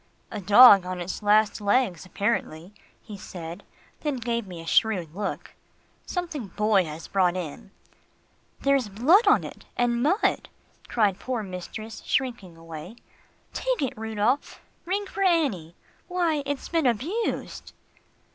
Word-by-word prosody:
"A 205 Hz, -, -5 dB
dog 205 Hz, 0 st, +8 dB
on 180 Hz, 0 st, -5 dB
its 175 Hz, +4 st, -5 dB
last 210 Hz, +1 st, +3 dB
legs 200 Hz, -5 st, +1 dB
apparently," 190 Hz, -4 st, -2 dB, 0.3 s
he 210 Hz, -, -9 dB
said, 170 Hz, -2 st, -8 dB, 0.4 s
then 295 Hz, -3 st, -2 dB
he -, -, -5 dB
gave 235 Hz, -2 st, -2 dB
me 180 Hz, -2 st, -8 dB
a 165 Hz, -, -9 dB
shrewd 180 Hz, -3 st, +1 dB
look. 200 Hz, +2 st, -5 dB, 0.5 s
"Something 335 Hz, -, -4 dB
Boy 205 Hz, -1 st, +2 dB
has 155 Hz, +1 st, -8 dB
brought 185 Hz, -2 st, +1 dB
in." 180 Hz, +5 st, -7 dB, 0.9 s
"There's 275 Hz, -5 st, +2 dB
blood 290 Hz, -, +4 dB
on -, -, +5 dB
it -, -, -10 dB
and 240 Hz, -1 st, +1 dB
mud," 350 Hz, -, +1 dB, 0.4 s
cried 205 Hz, -5 st, +1 dB
poor 250 Hz, -4 st, -3 dB
mistress, 200 Hz, +4 st, -7 dB
shrinking 235 Hz, -10 st, -2 dB
away. 165 Hz, +4 st, -9 dB, 0.6 s
"Take -, -, -1 dB
it, 265 Hz, -, -1 dB
Rudolph. 220 Hz, +4 st, -1 dB, 0.3 s
Ring 395 Hz, +3 st, -1 dB
for 395 Hz, -, -6 dB
Annie. 275 Hz, -, +1 dB, 0.3 s
Why, 345 Hz, -4 st, 0 dB
it's 285 Hz, -1 st, -3 dB
been 325 Hz, -5 st, +1 dB
abused." 315 Hz, -, -2 dB
215 Hz, 135 wpm, -26 LUFS, 185-270 Hz, 0.9 s, dog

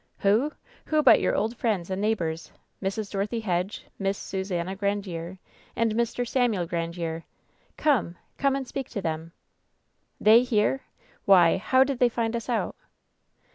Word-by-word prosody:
"Who? 220 Hz, +9 st, +2 dB, 0.4 s
Who 310 Hz, -1 st, +2 dB
but -, -, +7 dB
your -, -, +1 dB
old 225 Hz, +3 st, 0 dB
friends 200 Hz, -7 st, -1 dB
and 190 Hz, +1 st, -2 dB
neighbors, 170 Hz, -7 st, -1 dB, 0.3 s
Mrs. 200 Hz, +1 st, -3 dB
Dorothy 210 Hz, +4 st, -2 dB
Hedge, 185 Hz, -1 st, -2 dB
Miss 195 Hz, 0 st, 0 dB
Susannah 190 Hz, -1 st, -3 dB
Grandiere 190 Hz, -3 st, -3 dB, 0.4 s
and 230 Hz, -1 st, +1 dB
Mr. 235 Hz, +2 st, -1 dB
Samuel 230 Hz, -8 st, +1 dB
Grandiere. 165 Hz, -1 st, -3 dB, 0.6 s
Come! 245 Hz, -, +1 dB, 0.2 s
Come 275 Hz, -1 st, +2 dB
and 270 Hz, -2 st, -3 dB
speak 270 Hz, +1 st, -5 dB
to 205 Hz, -, -4 dB
them." 160 Hz, 0 st, -3 dB, 0.9 s
"They 220 Hz, +2 st, +7 dB
here! 250 Hz, +1 st, +1 dB, 0.4 s
Why, 180 Hz, -4 st, +6 dB
how 260 Hz, +6 st, +4 dB
did 270 Hz, -2 st, -3 dB
they 245 Hz, -, +5 dB
find 230 Hz, -1 st, -1 dB
us 230 Hz, +1 st, -5 dB
out 235 Hz, -3 st, -1 dB
205 Hz, 145 wpm, -26 LUFS, 180-235 Hz, 0.9 s, but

